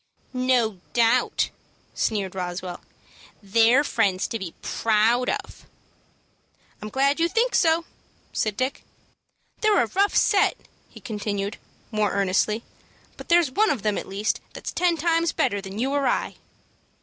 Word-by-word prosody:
"No 250 -6 +1
doubt," 240 +1 +2 0.4
sneered 200 -4 -1
Roswell. 180 -1 -5 0.6
"They're 230 +7 +4
friends 200 -9 +1
to 230 - -3
be 180 -4 -7
proud 230 +3 +2
of." - - -5 1.1
"I'm 215 - -6
glad 275 +5 +1
you 335 - +3
think 475 +6 +1
so," 330 0 +3 0.5
said 215 -2 -1
Dick. 260 +1 -2 0.8
"They're 425 - +3
a - - 0
rough 395 - +1
set," 400 -1 +3 0.3
he - - -14
continued, 205 -3 -3 0.3
more 215 -3 0
earnestly; 200 +3 +1 0.5
"but - - -12
there's 340 -5 +4
one 425 +10 +3
of 250 - -1
them, 210 -1 +1
at - - -4
least, 200 +2 -1
that's - - -6
ten 350 -2 +2
times 330 +1 +1
better 200 0 0
than 195 0 -8
you 260 +4 0
or 285 -1 +1
I." - - -1
230 Hz, 140 wpm, -24 LUFS, 205-290 Hz, 1.1 s, They're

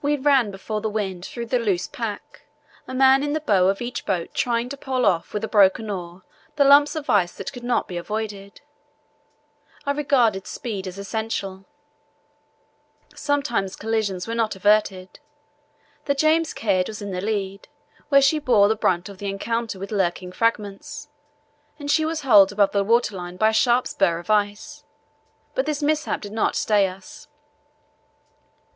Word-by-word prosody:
We 295 +1 +1
ran 270 -5 +3
before 210 +2 -5
the 220 - -1
wind 195 -4 -3
through 235 -1 -6
the 245 +2 0
loose 195 -6 0
pack, 215 -1 -7 0.4
a - - -7
man 265 +1 +5
in 290 0 -1
the 310 - 0
bow 200 -11 +2
of 195 +4 0
each 245 +1 -5
boat 180 -4 -2
trying 235 0 0
to 280 - -5
pole 260 -2 -1
off 170 -4 +1
with 210 - -4
a - - -1
broken 205 +1 +3
oar 180 -1 -7 0.3
the 285 - +4
lumps 285 +2 +6
of 310 -2 -5
ice 175 -1 +2
that - - -7
could 245 -2 -9
not 245 0 0
be 180 - -6
avoided. 200 +1 -5 1.2
I 280 - +1
regarded 250 -9 +1
speed 200 -6 -5
as 185 +1 -7
essential. 200 -2 -4 1.5
Sometimes 280 -10 -1
collisions 210 -4 -2
were 230 - -3
not 225 -3 0
averted. 195 -2 +1 0.9
The 280 - +1
James 315 +3 +2
Caird 190 -4 +1
was 215 -1 -7
in 200 - -5
the 180 -1 -3
lead, 200 -2 -3 0.4
where 275 -1 +5
she 305 +3 +3
bore 225 -8 +4
the 220 - +2
brunt 180 -3 0
of 200 -2 -11
the 200 - -3
encounter 230 +2 -3
with 195 +2 -7
lurking 180 -2 -1
fragments, 205 -2 -2 0.7
and 290 -1 -3
she 315 +1 +3
was 320 -1 -2
holed 205 -8 +6
above 205 -1 +2
the 200 -1 +1
water 225 -1 +2
line 180 0 -7
by 215 +3 +4
a - - -2
sharp 240 +2 +3
spur 175 -4 +1
of 175 +4 -5
ice, 205 -1 -1 0.7
but 260 +3 -1
this 300 -1 -2
mishap 305 0 0
did 205 - -8
not 220 - 0
stay 205 -2 +2
us. 295 +11 -11
215 Hz, 175 wpm, -23 LUFS, 195-255 Hz, 1.5 s, lumps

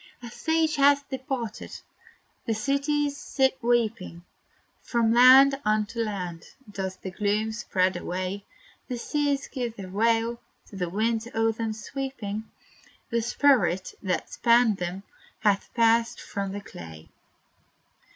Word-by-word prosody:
A 235 - -8
sage 320 +2 0
hath 280 0 +4
departed! 260 -4 -5 0.7
the 225 - +1
cities 285 +4 0
sit 265 -2 +1
weeping; 230 -7 0 0.6
From 230 -2 +1
land 265 +3 +7
unto 215 +2 0
land 185 -7 -3 0.3
does 190 -2 -4
the 190 - -8
gloom 210 +3 0
spread 190 -4 0
away. 185 +3 -4 0.4
The 250 - -4
seas 285 +2 -1
give 240 -4 -4
their 195 -3 -8
wail 230 +3 +1 0.3
to - - -12
the 180 -3 -2
winds 225 +4 0
o'er 225 0 +3
them 225 0 -3
sweeping 220 -2 -5 0.7
The 235 0 +1
spirit, 225 -7 +2
that 185 -2 -2
spanned 235 -3 +4
them, 180 +2 -4 0.4
hath 205 -2 +1
passed 230 0 +3
from 200 -2 -4
the 205 +1 -5
clay! 80 - -11
225 Hz, 125 wpm, -26 LUFS, 200-255 Hz, 0.7 s, land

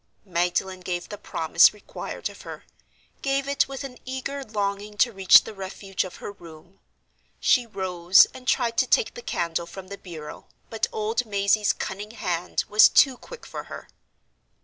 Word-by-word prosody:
Magdalen 180 +1 -1
gave 180 -1 -4
the 205 - -7
promise 165 +1 +4
required 210 - -6
of - - -12
her—gave 275 0 -6
it 280 0 +2
with 270 0 -6
an 255 -2 -9
eager 265 +2 -5
longing 205 -2 -3
to 240 - +3
reach 195 -3 +7
the 220 - -9
refuge 195 0 -4
of 185 - -9
her - - -7
room. 175 0 -15 0.6
She 245 -3 +3
rose, 185 -3 +4
and 255 -1 -12
tried 235 -2 +1
to - - +3
take 485 - +2
the 480 - -9
candle 170 - -2
from 185 +2 -10
the 200 - -8
bureau, 160 -4 -10 0.2
but 225 - 0
old 225 +2 -2
Mazey's 200 0 +2
cunning 210 +4 -6
hand 180 -4 -2
was 210 +1 +7
too 270 -2 +5
quick 480 - -12
for - - -7
her. - - -10
200 Hz, 165 wpm, -25 LUFS, 185-235 Hz, 0.6 s, reach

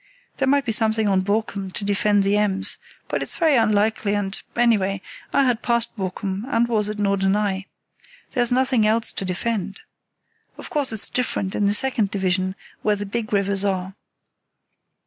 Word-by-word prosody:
There 270 - +1
might 280 0 +3
be 225 - 0
something 220 0 +2
on 190 -2 +3
Borkum 200 -1 -1
to 200 - -3
defend 205 0 +2
the 200 +1 +2
Ems; 205 -1 +1 0.3
but - - -2
it's - - -3
very 320 -4 +3
unlikely, 215 -2 +2
and, 200 -1 -2
anyway, 205 -5 +2 0.3
I 275 - +3
had 245 -3 +1
passed 235 -1 0
Borkum 190 0 -3
and 235 -3 +2
was 215 -3 +1
at 210 - -4
Norderney. 200 -1 +1 0.6
There's 245 -3 +1
nothing 255 -3 +3
else 220 +1 +2
to 195 - -4
defend. 195 +1 -2 0.8
Of - - -9
course 285 -4 0
it's 220 -2 -1
different 200 -6 -1
in 205 - +1
the 205 - +2
second 225 -4 +1
division, 185 -1 0 0.3
where 210 -1 +2
the 205 0 -5
big 215 +2 -4
rivers 200 -1 +1
are. 190 -1 -1
210 Hz, 165 wpm, -22 LUFS, 195-230 Hz, 0.8 s, might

